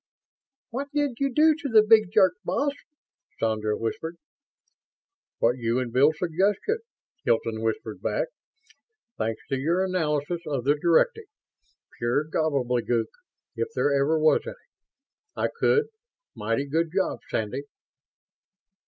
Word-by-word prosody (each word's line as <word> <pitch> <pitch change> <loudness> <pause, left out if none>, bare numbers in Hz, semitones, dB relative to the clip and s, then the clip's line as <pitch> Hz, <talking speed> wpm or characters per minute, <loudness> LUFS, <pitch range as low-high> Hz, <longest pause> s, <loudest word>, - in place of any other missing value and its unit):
"What 270 +4 -3
did 285 -5 0
you 275 -1 +1
do 310 +4 +5
to 300 -2 -5
the 220 -2 +6
big 215 -3 +5
jerk, 185 -3 +5
boss?" 285 0 0 0.7
Sandra 110 -1 0
whispered. 160 +9 -4 1.2
"What 120 +2 +2
you 115 0 0
and 125 -2 -2
Bill 140 +4 +5
suggested," 190 - 0 0.4
Hilton 115 -1 0
whispered 110 -1 -3
back. - - -1 0.9
"Thanks 110 0 -2
to 135 -2 -1
your 170 +7 +1
analysis 165 -2 -1
of 140 -5 -2
the 140 +3 +4
directive 175 - +2 0.7
pure 120 +5 +1
gobbledygook 125 -7 0 0.4
if 450 - -1
there 145 - +2
ever 140 +3 +2
was 155 0 +4
any - - -5 0.8
I - - 0
could. 445 - +3 0.5
Mighty 115 +6 -1
good 160 +3 0
job, 190 +1 0
Sandy." 110 +5 -2
155 Hz, 125 wpm, -26 LUFS, 125-205 Hz, 1.2 s, the